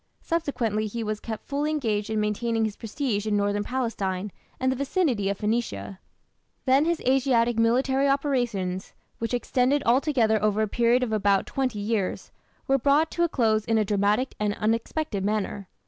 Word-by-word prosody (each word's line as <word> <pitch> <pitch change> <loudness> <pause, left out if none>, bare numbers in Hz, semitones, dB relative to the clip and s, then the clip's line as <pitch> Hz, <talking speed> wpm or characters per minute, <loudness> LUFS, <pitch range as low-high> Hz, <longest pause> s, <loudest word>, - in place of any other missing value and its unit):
Subsequently 235 -10 -1
he 230 +2 -4
was 215 -1 -3
kept 220 -1 -6
fully 290 +2 -1
engaged 220 -9 -1
in 220 -1 0
maintaining 225 +2 0
his 210 -2 -3
prestige 220 -2 -3
in 210 -1 +1
northern 205 0 0
Palestine 205 -6 -2 0.3
and 260 0 +1
the - - -1
vicinity 270 - 0
of 200 - -2
Phoenicia. 210 - -2 0.7
Then 270 +3 +4
his 340 -1 0
Asiatic 245 -3 +2
military 265 +4 +2
operations, 240 -10 -1 0.3
which 230 +2 -1
extended 260 +3 +1
altogether 235 -4 +3
over 215 0 +2
a - - 0
period 240 +3 +2
of 240 - -2
about 200 -2 +2
twenty 260 -5 -2
years, 205 -2 -2 0.4
were 270 0 +3
brought 285 +5 +3
to 345 - 0
a 340 - +2
close 220 -6 +2
in 225 0 +1
a 215 - +2
dramatic 205 +5 +1
and 210 -1 0
unexpected 225 +1 -1
manner. 205 -1 -2
230 Hz, 165 wpm, -26 LUFS, 210-265 Hz, 0.7 s, Then